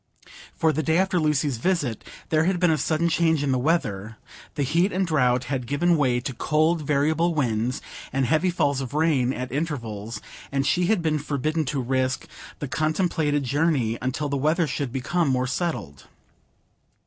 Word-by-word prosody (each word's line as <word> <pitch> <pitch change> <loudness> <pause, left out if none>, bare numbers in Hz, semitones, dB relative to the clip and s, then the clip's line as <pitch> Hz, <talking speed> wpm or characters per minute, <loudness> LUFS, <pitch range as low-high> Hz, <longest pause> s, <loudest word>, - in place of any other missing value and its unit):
For 160 -1 +2
the 155 - 0
day 160 +2 +1
after 190 -1 +2
Lucy's 150 -4 +1
visit 145 - -1 0.3
there 155 0 +3
had 185 0 +1
been 175 -2 +4
a 155 - +2
sudden 160 +1 +1
change 160 -3 +2
in 140 - +1
the 130 - +1
weather; 115 - -1 0.4
the 145 - 0
heat 170 +8 +2
and 190 +1 0
drought 125 -6 +2
had 125 -1 -3
given 170 +6 +2
way 130 -5 +2
to 130 - -4
cold 155 +6 +1
variable 155 +4 +1
winds, 120 -3 -1 0.3
and 135 0 +1
heavy 155 +7 +2
falls 145 -6 +1
of 135 +2 -6
rain 150 -6 +2
at 125 -1 -5
intervals; 115 -8 -4 0.3
and 135 0 0
she 175 +3 +2
had 205 -4 +2
been 155 -2 +1
forbidden 155 +2 -1
to 135 +2 -2
risk 130 +1 -1 0.3
the 145 - -4
contemplated 155 -1 0
journey 135 -4 +1
until 130 +4 -2
the 140 0 -1
weather 155 +5 +2
should 140 -2 -3
become 155 +6 0
more 130 -1 +1
settled. 125 - -3
145 Hz, 175 wpm, -24 LUFS, 130-160 Hz, 0.4 s, been